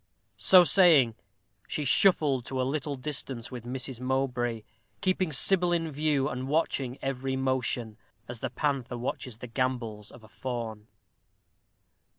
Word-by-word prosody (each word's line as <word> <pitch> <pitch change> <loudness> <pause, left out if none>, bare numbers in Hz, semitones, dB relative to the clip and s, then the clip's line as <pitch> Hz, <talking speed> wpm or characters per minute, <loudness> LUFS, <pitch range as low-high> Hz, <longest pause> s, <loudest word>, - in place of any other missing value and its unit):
So 185 -1 +7
saying, 155 - +5 0.5
she 150 - -3
shuffled 145 -4 +3
to 130 - -3
a - - +2
little 140 +2 -2
distance 135 -3 -5
with 120 -2 -7
Mrs. 130 0 -5
Mowbray, 125 -3 -1 0.4
keeping 185 -3 0
Sybil 175 +5 +3
in 165 -2 0
view, 145 -2 +1
and 130 -2 -4
watching 140 -4 0
every 135 0 -2
motion, 130 -4 -1 0.3
as 120 -1 -6
the - - -3
panther 135 -4 -2
watches 125 -1 -4
the 125 - -8
gambols 115 -4 -3
of 115 - -15
a - - -14
fawn. 115 -1 -6
130 Hz, 140 wpm, -28 LUFS, 120-150 Hz, 0.5 s, So